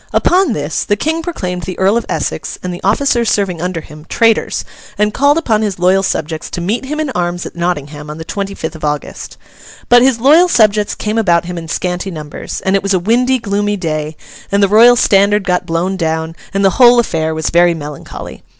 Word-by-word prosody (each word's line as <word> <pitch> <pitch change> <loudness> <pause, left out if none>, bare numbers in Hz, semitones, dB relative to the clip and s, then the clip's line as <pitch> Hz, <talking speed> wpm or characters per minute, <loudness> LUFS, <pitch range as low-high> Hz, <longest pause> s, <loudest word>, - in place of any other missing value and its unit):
Upon 360 -7 +2
this, 145 -2 -2
the 205 - 0
King 320 +9 -1
proclaimed 185 - -4
the 185 +1 -6
Earl 195 +3 +2
of 235 - -1
Essex - - -3
and 180 -1 -3
the 175 - -8
officers 235 +2 +1
serving 185 -5 -1
under 180 -2 -3
him, 150 +1 -14
traitors, 225 -1 +1 0.3
and 210 0 +1
called 285 +5 +3
upon 225 -10 +1
his 205 -4 -2
loyal 185 +2 +3
subjects 160 -4 -3
to - - -5
meet 210 +9 -2
him 300 +3 -4
in 305 -3 -2
arms 175 -3 -2
at - - -9
Nottingham 150 -4 -3
on 150 - -7
the 160 - -8
twenty 200 +2 -4
fifth 160 +1 -5
of 160 - -12
August. 150 -1 -4 0.5
But 245 0 +7
his 255 -2 +3
loyal 305 +9 +5
subjects 210 - +2
came 215 +1 -2
about 170 -5 +2
him 180 0 -5
in 165 -1 -6
scanty 180 +3 -3
numbers, 155 -4 -7
and 190 +1 +2
it 195 - +2
was 195 0 0
a - - +2
windy, 245 +7 +2
gloomy 205 -2 -1
day, 155 -3 -3 0.3
and 200 0 +2
the - - +5
Royal 230 +5 +6
Standard 205 -2 +3
got 180 -1 -1
blown 175 +4 -1
down, 160 -1 -2 0.2
and 195 0 0
the 195 - +4
whole 240 0 +7
affair 160 -8 -1
was 160 -1 -2
very 175 0 +4
melancholy. 150 -2 -8
195 Hz, 215 wpm, -15 LUFS, 170-225 Hz, 0.5 s, But